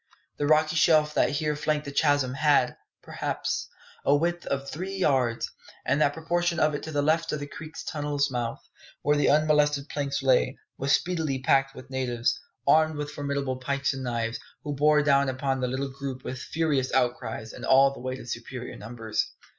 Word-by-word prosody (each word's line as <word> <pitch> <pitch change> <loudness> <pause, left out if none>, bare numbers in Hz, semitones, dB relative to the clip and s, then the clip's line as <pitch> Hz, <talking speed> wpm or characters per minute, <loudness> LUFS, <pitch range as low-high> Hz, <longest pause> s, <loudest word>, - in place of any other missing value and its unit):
The 145 - 0
rocky 155 +1 +3
shelf' 155 -2 +4
that - - +3
here 150 +1 -1
flanked 150 0 -1
the 140 - -5
chasm 145 -3 +2
had, 145 +1 +3 0.3
perhaps, - - -3 0.4
a 140 - +4
width 175 +3 -1
of 140 0 -2
three 185 +7 -5
yards, 130 -10 +1 0.3
and 140 +3 +2
that 145 -1 +3
portion 175 0 +1
of 155 -1 +3
it 145 - -3
to 160 - -6
the 145 -1 0
left 160 +2 +2
of 150 - -2
the 145 - -4
creek 155 +2 -10
tunnel's 145 -2 -1
mouth, 120 -2 -3 0.4
where 145 +1 +3
the 145 - +3
unmolested 150 -1 +3
planks 140 -1 -2
lay, 130 -2 +3 0.2
was 135 +1 -1
speedily 160 -6 +1
packed 135 +1 +2
with 130 - -11
natives, 125 -2 0 0.3
armed 155 0 +4
with 145 0 -4
formidable 140 -3 -2
pikes 140 +2 -1
and 135 0 -5
knives, 115 -2 -2 0.2
who 145 - -3
bore 150 +1 +4
down 140 -1 +3
upon 135 0 -1
the 125 - 0
little 135 +2 -2
group 135 -1 -6
with 130 - -5
furious 145 -3 0
outcries 115 -2 -1
and - - -10
all 135 +1 +5
the - - -10
weight 130 +1 -4
of - - -10
superior 120 +1 -6
numbers. 110 0 -3
140 Hz, 185 wpm, -27 LUFS, 130-150 Hz, 0.4 s, all